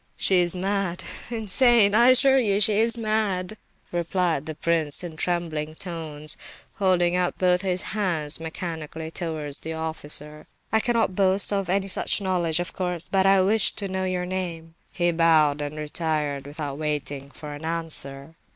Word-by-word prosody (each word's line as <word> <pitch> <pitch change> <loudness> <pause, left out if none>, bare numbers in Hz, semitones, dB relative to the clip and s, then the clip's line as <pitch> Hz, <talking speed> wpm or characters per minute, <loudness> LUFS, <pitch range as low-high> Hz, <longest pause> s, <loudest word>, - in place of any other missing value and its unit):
"She 190 - +3
is 175 0 +2
mad, 190 -1 -1 0.3
insane—I 230 0 +5
assure 265 +1 +5
you, 205 -5 +1
she 210 0 +4
is 230 +1 +1
mad," 215 -3 -1 0.4
replied 170 -3 -1
the 155 - -5
prince 160 -1 0
in 170 -3 -7
trembling 160 -3 -2
tones, 160 -4 -4 0.4
holding 180 -3 +2
out 180 -1 0
both 180 -1 +2
his 185 -2 0
hands 170 -8 -1
mechanically 160 -1 -6
towards 155 -5 -4
the 160 - -5
officer. 150 -1 -5 0.3
"I 220 - +5
cannot 230 -3 +1
boast 195 +1 +2
of 195 -2 -1
any 195 +1 +1
such 195 - +1
knowledge, 175 -4 0
of 175 - -3
course, 180 -2 -2
but 195 -1 +3
I 195 -1 +5
wished 210 +2 +2
to 200 - 0
know 190 0 -2
your 180 -1 -2
name." 175 -3 -5 0.2
He 175 -1 +1
bowed 160 -3 +3
and 145 +1 -5
retired 150 -2 -2
without 145 -1 -5
waiting 145 -2 -3
for 150 +1 -9
an 145 +2 -9
answer. 160 -3 -1
175 Hz, 160 wpm, -25 LUFS, 155-195 Hz, 0.4 s, insane—I